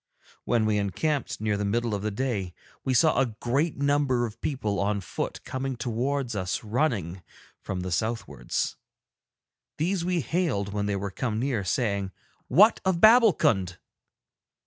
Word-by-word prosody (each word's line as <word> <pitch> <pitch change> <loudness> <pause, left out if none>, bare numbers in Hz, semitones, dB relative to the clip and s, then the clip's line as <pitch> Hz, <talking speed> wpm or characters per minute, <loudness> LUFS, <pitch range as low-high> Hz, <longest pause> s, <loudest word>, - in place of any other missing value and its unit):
When 115 -3 +2
we 105 -1 +2
encamped 140 +9 -1
near 105 -1 0
the 105 - -2
middle 115 +2 0
of 100 - -2
the 105 - -1
day 100 -5 -3 0.3
we 130 - 0
saw 155 +5 +4
a 120 -5 0
great 140 +7 0
number 140 -3 +2
of 110 -2 -9
people 110 -8 -2
on 100 +1 0
foot 95 - -5
coming 130 0 -3
towards 120 +2 -2
us 95 +1 -2
running, 105 - -1 0.4
from 95 -2 -4
the 90 0 -4
southwards. 100 - -2 1.0
These 175 +3 0
we 180 -1 0
hailed 125 - -1
when 105 0 -1
they 100 - 0
were 100 0 -3
come 110 +2 -2
near, 125 -5 -1
saying, 100 -1 -1 0.4
'What 210 +5 +5
of 185 -2 +1
Babbulkund?' 175 - +5
115 Hz, 150 wpm, -27 LUFS, 100-140 Hz, 1.0 s, What